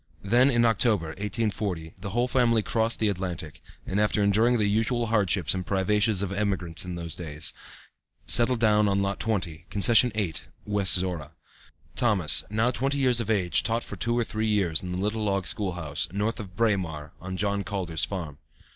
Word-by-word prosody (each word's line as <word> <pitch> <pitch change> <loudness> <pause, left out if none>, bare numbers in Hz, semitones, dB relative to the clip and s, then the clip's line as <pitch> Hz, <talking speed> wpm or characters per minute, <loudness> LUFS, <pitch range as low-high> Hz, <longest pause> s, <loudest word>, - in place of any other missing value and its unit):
Then 120 +7 +4
in 120 -3 +3
October, 110 -6 +2
1840, 100 -3 -3
the 100 - -5
whole 120 +4 0
family 120 -4 +2
crossed 115 +1 0
the 110 - +1
Atlantic, 90 -6 -4 0.2
and 95 - -2
after 105 0 +1
enduring 110 +5 +3
the 105 - +1
usual 115 +3 +1
hardships 100 -5 +1
and 95 -1 -3
privations 100 +2 +2
of 100 - -3
emigrants 95 -5 -1
in 90 -1 -6
those 85 0 -6
early 80 -3 -6
days, 75 - -1 0.7
settled 120 0 +4
down 105 -2 +3
on 100 0 +1
lot 100 0 -2
20, 90 -8 -3
concession 115 +5 +5
8, 95 -8 -2 0.2
West 105 -2 +3
Zorra. 90 -5 -2 0.6
Thomas, 95 -10 +2
now 110 +4 +1
twenty 135 +3 -1
years 130 -3 +3
of 115 - -3
age, 95 -5 +2
taught 115 +1 -1
for - - -7
two 120 0 -1
or 120 - +2
three 110 0 -3
years 95 -7 +1
in 90 - -6
the 90 - -3
little 105 +3 -2
log 100 -2 -1
school 95 0 -1
house, 80 -1 -2
north 105 +5 -2
of 95 -4 -9
Braemar, 90 -9 -1
on 95 +1 -6
John 100 0 -1
Calder's 90 -5 -3
farm. 80 -7 -4
100 Hz, 185 wpm, -26 LUFS, 90-110 Hz, 0.7 s, concession